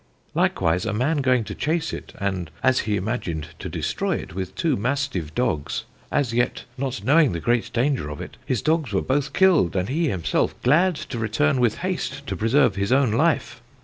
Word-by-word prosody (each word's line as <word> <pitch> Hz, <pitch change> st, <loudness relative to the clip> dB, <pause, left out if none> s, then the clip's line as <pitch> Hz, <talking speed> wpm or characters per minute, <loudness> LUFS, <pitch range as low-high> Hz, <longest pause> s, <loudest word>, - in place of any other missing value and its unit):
Likewise 85 Hz, +2 st, +1 dB
a -, -, -1 dB
man 135 Hz, +9 st, +1 dB
going 130 Hz, -4 st, +2 dB
to 105 Hz, -1 st, -6 dB
chase 160 Hz, +6 st, -1 dB
it, -, -, -7 dB
and 95 Hz, -4 st, -2 dB
as 130 Hz, -1 st, +4 dB
he 105 Hz, -, +2 dB
imagined, 90 Hz, -7 st, -3 dB
to -, -, -5 dB
destroy -, -, -1 dB
it -, -, -6 dB
with 95 Hz, +1 st, -5 dB
two 155 Hz, +5 st, +1 dB
mastive 120 Hz, -, -2 dB
dogs, 80 Hz, -, -1 dB, 0.3 s
as 135 Hz, -6 st, +1 dB
yet 120 Hz, +1 st, 0 dB
not 130 Hz, -4 st, -3 dB
knowing 145 Hz, -, +4 dB
the 85 Hz, -, -2 dB
great 120 Hz, +8 st, 0 dB
danger 125 Hz, -, 0 dB
of 75 Hz, -, -7 dB
it, -, -, -8 dB
his 125 Hz, -, -1 dB
dogs 155 Hz, -8 st, +1 dB
were 95 Hz, -, +1 dB
both 140 Hz, +1 st, 0 dB
killed, 170 Hz, -, +4 dB
and 95 Hz, +1 st, 0 dB
he 160 Hz, +5 st, +1 dB
himselfe 85 Hz, -, 0 dB
glad 170 Hz, +8 st, +4 dB
to 125 Hz, -4 st, -6 dB
returne 130 Hz, +6 st, +1 dB
with 120 Hz, -3 st, +3 dB
hast -, -, -3 dB
to -, -, -3 dB
preserve 120 Hz, 0 st, +3 dB
his 100 Hz, +2 st, -1 dB
own 130 Hz, -3 st, +4 dB
life. 125 Hz, -2 st, +1 dB
120 Hz, 195 wpm, -23 LUFS, 100-145 Hz, 0.3 s, as